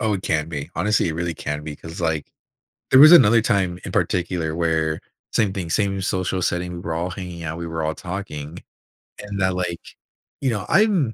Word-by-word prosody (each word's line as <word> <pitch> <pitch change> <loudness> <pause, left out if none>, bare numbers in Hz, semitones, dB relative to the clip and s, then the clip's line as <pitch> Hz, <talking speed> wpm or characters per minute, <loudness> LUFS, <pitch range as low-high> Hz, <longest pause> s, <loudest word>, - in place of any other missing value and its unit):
Oh, 110 -3 +1
it 95 - -4
can 80 0 0
be. 75 -3 -5
Honestly, 100 +1 +1
it 80 - -2
really 85 0 -2
can 75 0 -4
be 75 -1 -5
'cause, 80 +3 -9
like, 80 -3 -1 0.7
there 130 - +8
was 155 +3 +10
another 115 -9 +8
time 95 -4 0
in - - -6
particular 85 -3 -1
where 80 -2 0 0.3
same 105 -4 +2
thing, 95 -4 -4
same 100 +1 0
social 95 0 -1
setting, 90 0 -1
we 85 - -6
were 85 -2 -4
all 85 +3 -2
hanging 90 -2 -7
out, 80 +1 -4
we 85 0 -5
were 80 -1 -3
all 80 0 -1
talking. 85 -4 -6 0.6
And 100 -1 -5
that, 95 -1 +2
like, 90 -2 -2 0.6
you 135 - 0
know, 105 -4 -2
I'm 190 - +3
90 Hz, 205 wpm, -22 LUFS, 80-100 Hz, 0.7 s, was